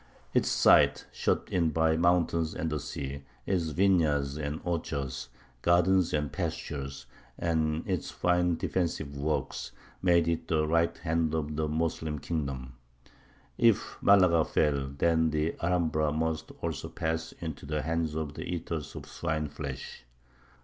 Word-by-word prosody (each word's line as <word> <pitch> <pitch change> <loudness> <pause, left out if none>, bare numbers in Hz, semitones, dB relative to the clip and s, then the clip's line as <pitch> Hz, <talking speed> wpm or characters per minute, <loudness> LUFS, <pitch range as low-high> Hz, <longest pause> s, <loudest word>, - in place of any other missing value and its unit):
Its - - +3
site, - - +5
shut - - 0
in 85 -3 +2
by 80 +1 +2
mountains 85 -1 +2
and 80 0 -2
the 75 - -1
sea, 70 0 -5 0.2
its 90 -4 +1
vineyards 80 -5 +2
and 75 0 -3
orchards, 70 -7 -3 0.3
gardens 90 +1 +4
and 75 -2 -1
pastures, 70 -1 -4 0.3
and 80 -1 0
its 90 -4 -1
fine 90 -1 +2
defensive 80 -4 -2
works, 75 +2 -2 0.3
made 85 -2 +4
it 85 -1 -1
the 75 -1 +2
right 85 +2 +2
hand 80 -1 0
of 75 -1 -2
the 80 0 0
Moslem 80 0 -1
kingdom. 70 -5 -4 0.9
If 115 -3 +2
Malaga 90 -5 +6
fell, 70 -4 +1
then 80 +4 +2
the 75 +1 0
Alhambra 80 -3 +1
must 80 0 -2
also 80 -5 -3
pass 80 0 -2
into 80 -5 -7
the 75 0 -1
hands 80 -1 -1
of 80 -2 -3
the - - -7
"eaters 85 -3 -4
of - - -6
swineflesh." 75 -6 -4
80 Hz, 135 wpm, -29 LUFS, 75-85 Hz, 0.9 s, Malaga